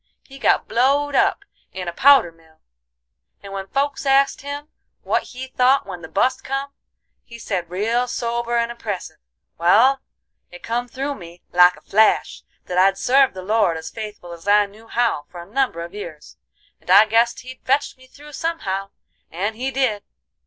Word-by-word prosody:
He 275 0 -14
got - - +2
blowed 280 +4 +2
up 400 +3 +2 0.3
in 185 -1 -6
a 170 - -3
powder 270 -6 +5
mill, 160 -1 -25 0.8
and 200 0 -9
when 195 0 -5
folks 275 +4 -1
asked 275 0 +3
him 285 +1 -6 0.4
what - - +1
he 255 +1 -8
thought 260 0 +2
when 180 -3 -8
the 160 - -8
bust 250 +9 0
come, 275 +1 -4 0.5
he 235 - -12
said, 185 -6 -4
real 225 +7 0
sober 235 0 -2
and 235 0 0
impressive: 210 -5 -6 0.4
'Wal, 235 +11 +5 0.5
it 175 - -13
come 240 +2 -2
through 275 +3 -4
me, 175 -6 -12
like 180 0 +6
a - - -17
flash, 215 +2 +2 0.2
that 180 0 -1
I'd 195 +1 +4
served 260 +3 +3
the 185 - -7
Lord 205 -4 +1
as 160 - -7
faithful 210 -5 -8
as 170 +3 -13
I 205 0 +5
knew 215 +3 -16
how 230 -12 0
for 175 - -10
a 170 - -9
number 210 -6 -1
a 170 - -12
years, 170 -7 -9 0.4
and - - -20
I 200 +4 +8
guessed 230 +2 +2
He'd 255 0 -11
fetch 275 +3 0
me 260 0 -19
through 295 +3 -15
somehow, 195 - -3 0.4
and 200 +6 -3
He 255 +4 -2
did. 255 -6 0
225 Hz, 180 wpm, -21 LUFS, 185-265 Hz, 0.8 s, I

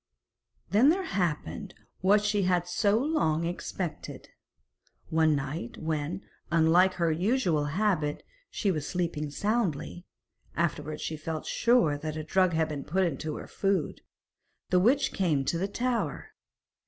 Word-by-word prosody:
Then 225 +8 +6
there 375 +4 +2
happened 165 - -2 0.2
what 205 +2 +4
she 210 -1 +1
had 180 -2 +1
so 200 +3 +2
long 225 - +1
expected. 175 0 -5 0.8
One 160 -1 +3
night, 140 -2 -4
when, 160 +3 -3 0.3
unlike 170 +3 +4
her 170 -2 +1
usual 175 - +1
habit, 155 -2 0 0.3
she 200 - 0
was 155 -5 -3
sleeping 165 -4 -2
soundly 180 -3 -2 0.5
afterwards 155 -2 -2
she 160 - -3
felt 155 0 -5
sure 235 -12 +2
that 155 +1 -4
a 155 - -3
drug 185 +2 +2
had 160 0 +2
been 145 -2 -4
put 190 +5 0
into 155 -2 -2
her - - -7
food 195 -6 -1 0.7
the 180 - +5
witch 270 +8 +3
came 155 -8 +1
to 165 - 0
the 195 - 0
tower. 240 +3 -2
170 Hz, 140 wpm, -28 LUFS, 155-200 Hz, 0.8 s, Then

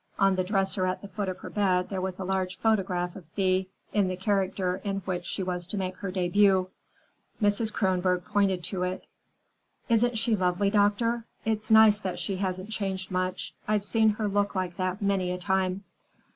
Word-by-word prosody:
On 195 -1 +4
the 185 - +1
dresser 190 -1 0
at 185 +2 -3
the - - -6
foot 195 0 -3
of 185 - -4
her - - -7
bed 185 -3 +1
there 190 -2 -2
was 185 -1 -3
a 190 - -4
large 190 0 -1
photograph 185 -5 0
of 190 - -9
Thea 190 -1 +2 0.3
in 205 -3 +3
the 185 - -2
character 190 -1 0
in 195 -1 -2
which 180 -2 -3
she 195 - -3
was 180 -1 -3
to 205 - -4
make 185 -1 -2
her 200 - -4
debut. 185 +1 +3 0.7
Mrs. 210 +1 +2
Kronborg 185 -3 +1
pointed 200 -4 +1
to 185 +2 -4
it. 180 +1 -2 0.8
"Isn't 235 +1 +3
she 225 0 +1
lovely, 185 +1 +1
doctor? 220 +3 +2 0.2
It's 215 -1 -1
nice 220 -1 +7
that 185 -3 -3
she 195 -2 -3
hasn't 185 +2 -3
changed 190 -3 -3
much. 185 0 -2
I've 210 -1 +1
seen 220 0 +3
her 215 - 0
look 205 0 0
like 185 -2 -2
that 185 +2 -2
many 195 -2 +1
a 180 - -2
time." 190 0 0
190 Hz, 190 wpm, -28 LUFS, 185-205 Hz, 0.8 s, nice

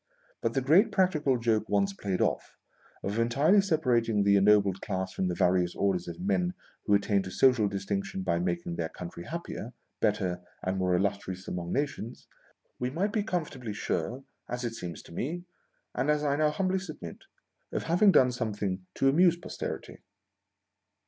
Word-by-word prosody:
But, 115 0 -1
the 135 - +2
great 175 - +5
practical 155 -9 +2
joke 110 -2 0
once 100 -1 +2
played 95 -2 -2
off, - - -1 0.5
of 100 +3 -2
entirely 140 - +4
separating 125 - +2
the 100 0 +5
ennobled 100 -1 +4
class 95 -2 -3
from 95 - -1
the 90 - -1
various 90 -1 +2
orders 95 -3 0
of 85 -1 -7
men 90 -2 0 0.3
who 105 - +5
attain 100 0 +2
to 95 - -6
social 125 0 +4
distinction 100 -1 -3
by 85 -2 +1
making 85 -1 -2
their 80 -1 -2
country 85 -1 -8
.happier, 155 -7 -6 0.3
better, 95 -5 0 0.2
and 95 +1 -1
more 90 -1 +2
illustrious 95 -1 -2
among 85 -1 -4
nations, 135 -5 -3 0.5
we 125 - -1
might 190 +9 -1
be 215 - +2
corn 180 -6 -1
'fortably 125 -7 -7
sure, 125 +5 -2 0.3
as 125 +1 -3
it 115 - -2
seems 90 -6 -7
to - - -15
me 170 - -3 0.3
— - - -46
and 130 +4 0
as 150 0 +2
I 140 -1 +2
now 155 +1 +3
humbly 185 +4 0
submit 190 - -9 0.2
— - - -49
of - - -2
having 180 +5 +5
done 125 -7 +5
something 105 -5 -3
to 135 - +2
amuse 170 +5 +5
Posterity. 175 - -6
110 Hz, 175 wpm, -29 LUFS, 95-145 Hz, 0.5 s, great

